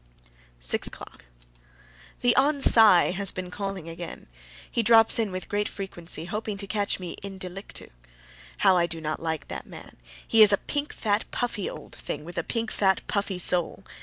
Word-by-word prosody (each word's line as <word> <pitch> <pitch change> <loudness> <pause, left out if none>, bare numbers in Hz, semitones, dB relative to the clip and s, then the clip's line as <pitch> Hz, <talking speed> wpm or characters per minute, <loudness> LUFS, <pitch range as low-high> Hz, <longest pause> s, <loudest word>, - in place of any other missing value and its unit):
SIX - - -1
O'CLOCK. - - -10 1.0
The 245 -1 +4
Hon. 285 +2 +3
Cy 220 -10 +6
has 195 +1 +2
been 185 -1 -6
calling 195 -4 -5
again. 165 +1 -7 0.5
He 235 - +1
drops 225 0 +5
in 220 -3 0
with 185 0 -5
great 205 0 -1
frequency, 175 -5 -6
hoping 210 +2 -4
to 200 - -5
catch 205 -1 -1
me 180 -2 -6
IN 195 -1 -7
DELICTU. 190 - -6 0.7
How 190 -2 +5
I 170 -1 +3
do 165 -1 -3
not 155 -1 -3
like 160 -1 -3
that - - -6
man! - - -12 0.3
He 225 - +5
is 210 -1 +9
a 200 - +4
pink, 290 +6 -3
fat, 210 -1 0
puffy 235 -5 -2
old - - -10
thing, 150 +1 -6
with 175 0 -5
a - - -1
pink, 230 +3 -3
fat, 190 -2 +2
puffy 200 -2 -1
soul. 180 -1 -1
195 Hz, 180 wpm, -26 LUFS, 175-215 Hz, 1.0 s, is